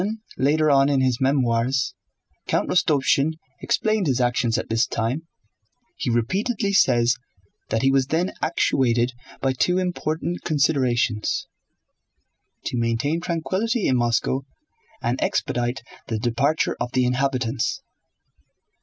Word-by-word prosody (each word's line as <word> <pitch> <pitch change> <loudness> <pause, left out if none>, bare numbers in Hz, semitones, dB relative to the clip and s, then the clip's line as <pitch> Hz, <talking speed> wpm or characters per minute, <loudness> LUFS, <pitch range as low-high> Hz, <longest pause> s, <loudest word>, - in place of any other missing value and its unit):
When 215 +4 -2 0.2
later 150 +3 +2
on 135 0 +4
in 140 -2 +2
his 130 -2 +1
memoirs 130 -1 +1 0.5
Count - - +1
Rostopchín 150 -3 +2 0.3
explained 215 -4 +1
his 130 -3 +1
actions 120 -1 +1
at - - -3
this 115 +1 +1
time, 125 +9 -2 0.7
he 135 - -3
repeatedly 200 - 0
says 120 -9 +4 0.5
that 110 +2 0
he 135 - +4
was 135 -1 +2
then 170 +5 0
actuated 125 -6 +1 0.3
by 135 -1 +1
two 180 +7 +1
important 175 -2 -2
considerations: 130 -7 +1 1.2
to 120 - -2
maintain 115 +8 0
tranquillity 190 +8 -1
in 130 - +2
Moscow 120 +2 +1 0.6
and 120 +2 -1
expedite 120 +1 -1 0.2
the 110 - -2
departure 125 +7 0
of 120 - -3
the 130 -1 +2
inhabitants. 125 -1 0
135 Hz, 120 wpm, -23 LUFS, 120-160 Hz, 1.2 s, on